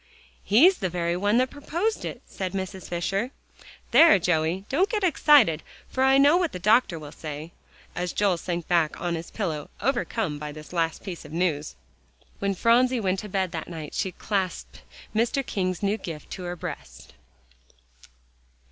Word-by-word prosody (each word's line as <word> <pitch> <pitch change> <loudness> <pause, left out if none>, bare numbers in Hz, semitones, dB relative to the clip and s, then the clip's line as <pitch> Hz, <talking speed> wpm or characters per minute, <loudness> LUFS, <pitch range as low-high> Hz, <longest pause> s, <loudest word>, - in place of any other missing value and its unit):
"He's 310 - +5
the 185 - -1
very 170 0 -1
one 205 +5 +2
that 255 +1 +2
proposed 340 +10 -2
it," - - -6
said 185 -1 -5
Mrs. 190 -1 -5
Fisher. 195 +7 -1 0.6
"There, 310 +1 +8
Joey, 175 +1 0
don't 365 +9 +1
get 420 -2 -1
excited, 290 - +5 0.3
for 260 - 0
I 265 0 +5
don't 275 - +6
know 295 +4 +6
what 350 -3 0
the - - -3
doctor 210 -1 +3
will 150 -2 -9
say," 155 +1 -7 0.4
as 175 0 -2
Joel 200 -4 +1
sank 170 0 -4
back 170 -3 +1
on 175 -1 -2
his 165 0 -5
pillow, 160 -9 -3
overcome 220 - -1
by 150 0 -6
this 155 +3 -11
last 165 -2 -1
piece 185 -4 -6
of 150 - -12
news. 160 - -1 0.6
When 200 -1 0
Phronsie 245 +5 +3
went 190 -3 0
to 210 - -7
bed 190 -2 -1
that 160 -2 -5
night 160 -3 -7
she 190 - -1
clasped 190 -2 -3 0.3
Mr. 240 +4 +1
King's 185 -3 -2
new 200 +2 +1
gift 155 -4 -8
to 185 - -6
her 175 0 -4
breast. - - -8
190 Hz, 175 wpm, -26 LUFS, 170-240 Hz, 0.6 s, There